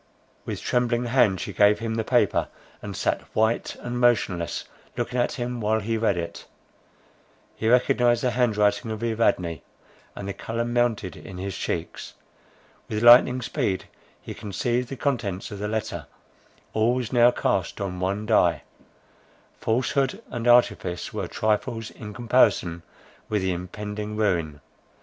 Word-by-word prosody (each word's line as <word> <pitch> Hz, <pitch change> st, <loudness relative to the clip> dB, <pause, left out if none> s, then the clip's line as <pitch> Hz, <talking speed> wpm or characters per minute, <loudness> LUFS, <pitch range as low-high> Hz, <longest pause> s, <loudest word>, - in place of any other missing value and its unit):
With -, -, -5 dB
trembling 120 Hz, 0 st, +1 dB
hand 120 Hz, -6 st, +3 dB
she -, -, -5 dB
gave 105 Hz, 0 st, +5 dB
him 115 Hz, -1 st, -3 dB
the 110 Hz, 0 st, -1 dB
paper, 110 Hz, -5 st, +2 dB, 0.3 s
and -, -, -6 dB
sat -, -, 0 dB
white 110 Hz, +1 st, +1 dB
and 120 Hz, 0 st, -4 dB
motionless 100 Hz, -9 st, +1 dB, 0.3 s
looking 125 Hz, -, -2 dB
at 120 Hz, -, +1 dB
him 120 Hz, -2 st, -4 dB
while 110 Hz, +1 st, +1 dB
he 110 Hz, +2 st, -2 dB
read 110 Hz, -4 st, +1 dB
it. 85 Hz, -1 st, -6 dB, 1.1 s
He 110 Hz, -, -1 dB
recognised 120 Hz, 0 st, +3 dB
the 125 Hz, -, +2 dB
hand 120 Hz, -3 st, +1 dB
writing 105 Hz, +2 st, +2 dB
of 110 Hz, +1 st, -4 dB
Evadne, 100 Hz, -7 st, 0 dB, 0.5 s
and 100 Hz, -, -6 dB
the 100 Hz, -, -3 dB
colour 115 Hz, +3 st, -3 dB
mounted 120 Hz, -5 st, 0 dB
in 95 Hz, -, -10 dB
his 95 Hz, 0 st, -4 dB
cheeks. -, -, -4 dB, 0.7 s
With 105 Hz, +1 st, -2 dB
lightning 125 Hz, +1 st, +7 dB
speed 95 Hz, -4 st, -1 dB, 0.3 s
he -, -, -8 dB
conceived 120 Hz, +5 st, -2 dB
the 135 Hz, -, -6 dB
contents 115 Hz, -10 st, -2 dB
of 100 Hz, -, -7 dB
the 105 Hz, -, -2 dB
letter; 110 Hz, 0 st, -3 dB, 0.7 s
all 110 Hz, +3 st, +2 dB
was 125 Hz, -1 st, -3 dB
now 120 Hz, 0 st, +6 dB
cast 100 Hz, -7 st, -1 dB
on 95 Hz, -2 st, -4 dB
one 100 Hz, +3 st, -1 dB
die; 90 Hz, -7 st, +3 dB, 1.0 s
falsehood 130 Hz, +3 st, 0 dB
and 120 Hz, 0 st, -3 dB
artifice 120 Hz, -7 st, +2 dB
were -, -, -3 dB
trifles 110 Hz, +1 st, -1 dB
in 105 Hz, -1 st, -9 dB
comparison 110 Hz, -8 st, +2 dB, 0.5 s
with 105 Hz, -3 st, 0 dB
the 95 Hz, -, +1 dB
impending 105 Hz, +4 st, -5 dB
ruin. 85 Hz, -9 st, 0 dB
110 Hz, 150 wpm, -25 LUFS, 100-120 Hz, 1.1 s, lightning